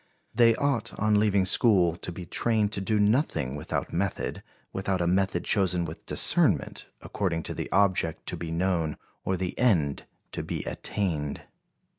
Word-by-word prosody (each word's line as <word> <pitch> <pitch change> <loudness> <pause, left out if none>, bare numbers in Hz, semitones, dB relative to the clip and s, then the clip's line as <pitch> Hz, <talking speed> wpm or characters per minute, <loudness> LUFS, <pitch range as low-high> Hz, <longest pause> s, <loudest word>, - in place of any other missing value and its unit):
They 115 -1 +5
ought, 140 -5 -1
on 105 0 +3
leaving 100 -2 +2
school, 95 -4 +4
to 90 - -6
be 90 +1 -8
trained 110 +3 +1
to 100 - -3
do 105 +2 +1
nothing 105 - +1
without 75 - -4
method, 95 +2 -2 0.3
without 95 -1 -1
a 85 - 0
method 95 0 +1
chosen 90 -4 +1
with 80 0 -9
discernment, - - +1 0.2
according 85 -5 -2
to - - -4
the - - -5
object 95 -4 +1
to - - -3
be 85 - -6
known 85 -2 0 0.3
or 95 - -1
the 90 0 -3
end 85 - +2 0.2
to - - -4
be - - -4
attained." 80 -8 -2
95 Hz, 160 wpm, -27 LUFS, 85-105 Hz, 0.3 s, They